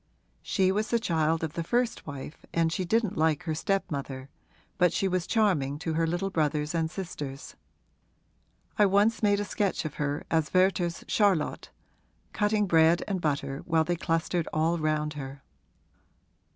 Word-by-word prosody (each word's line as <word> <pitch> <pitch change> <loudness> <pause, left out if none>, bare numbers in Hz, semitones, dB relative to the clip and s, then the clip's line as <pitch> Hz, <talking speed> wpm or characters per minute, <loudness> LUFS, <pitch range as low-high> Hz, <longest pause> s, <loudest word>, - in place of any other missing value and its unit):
She 190 -2 +1
was 210 +3 -1
the 235 - +3
child 165 -6 0
of 155 -2 -3
the 170 - -3
first 240 +3 -1
wife 145 +1 -8
and 165 -1 +1
she 185 - -1
didn't 215 -1 0
like 160 0 +2
her 160 -3 -2
stepmother, 140 -6 -3 0.5
but 180 -2 +5
she 195 - +1
was 185 -2 -1
charming 175 - +1
to 165 +1 -3
her 165 +1 +1
little 175 +4 -1
brothers 150 -2 0
and 165 -1 0
sisters. 150 -7 -7 1.2
I 205 - +6
once 205 +4 +3
made 205 -2 +3
a 205 - -1
sketch 200 -4 -1
of 155 - -4
her 145 0 -1
as 160 -2 +1
Werther's 185 -2 +2
Charlotte, 195 -7 +1 0.6
cutting 210 0 +1
bread 165 -1 +4
and 190 -3 -2
butter 140 -3 -1
while 165 -3 +2
they 175 +2 -1
clustered 165 0 -1
all 165 +2 +1
round 155 -1 0
her. 135 -1 -8
165 Hz, 160 wpm, -28 LUFS, 155-195 Hz, 1.2 s, I